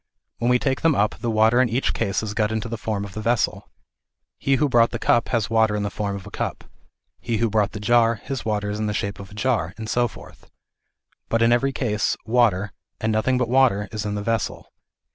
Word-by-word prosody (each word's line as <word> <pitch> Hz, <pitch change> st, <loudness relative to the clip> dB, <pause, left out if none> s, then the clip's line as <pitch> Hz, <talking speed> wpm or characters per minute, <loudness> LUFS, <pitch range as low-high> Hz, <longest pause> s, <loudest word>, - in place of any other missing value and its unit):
When 120 Hz, -, +1 dB
we 125 Hz, -, +5 dB
take 135 Hz, +1 st, -1 dB
them 165 Hz, -3 st, +3 dB
up, 105 Hz, -1 st, 0 dB
the 120 Hz, -, -2 dB
water 110 Hz, +2 st, +4 dB
in 125 Hz, -, +2 dB
each 120 Hz, +4 st, 0 dB
case 100 Hz, -4 st, -1 dB
has 110 Hz, -2 st, -4 dB
got 105 Hz, 0 st, 0 dB
into 110 Hz, +1 st, -2 dB
the 115 Hz, -, -4 dB
form 105 Hz, -2 st, -3 dB
of 100 Hz, -, -10 dB
the 110 Hz, -, -5 dB
vessel. 115 Hz, -1 st, 0 dB, 0.7 s
He 135 Hz, -, +2 dB
who 150 Hz, +2 st, +2 dB
brought 120 Hz, -3 st, +4 dB
the -, -, -4 dB
cup, 120 Hz, -, +2 dB
has 115 Hz, -4 st, 0 dB
water 110 Hz, -1 st, +2 dB
in 105 Hz, -, -1 dB
the 100 Hz, -, -2 dB
form 100 Hz, -1 st, -3 dB
of 100 Hz, -, -8 dB
a -, -, -10 dB
cup, -, -, -4 dB, 0.6 s
he 115 Hz, -2 st, -2 dB
who 115 Hz, 0 st, 0 dB
brought 105 Hz, -1 st, +1 dB
the 105 Hz, -, -5 dB
jar, 115 Hz, +2 st, +3 dB
his 135 Hz, +4 st, -6 dB
water 105 Hz, -1 st, -1 dB
is 105 Hz, -, -4 dB
in 110 Hz, -, -1 dB
the 105 Hz, -, -2 dB
shape 100 Hz, -1 st, -3 dB
of 100 Hz, -1 st, -9 dB
a 105 Hz, -, -13 dB
jar, 110 Hz, -7 st, -1 dB
and 110 Hz, -1 st, -6 dB
so 120 Hz, +2 st, +1 dB
forth; -, -, -14 dB, 0.8 s
but, 115 Hz, 0 st, +2 dB
in 115 Hz, -, +4 dB
every 135 Hz, +3 st, +2 dB
case, 110 Hz, -6 st, -1 dB
water, 110 Hz, -4 st, +2 dB, 0.3 s
and 110 Hz, 0 st, 0 dB
nothing 110 Hz, +4 st, +1 dB
but 125 Hz, -1 st, 0 dB
water 120 Hz, -5 st, +3 dB
is 110 Hz, -1 st, -4 dB
in 105 Hz, 0 st, -3 dB
the 105 Hz, -, -3 dB
vessel. 115 Hz, -1 st, -3 dB
110 Hz, 240 wpm, -23 LUFS, 105-120 Hz, 0.8 s, we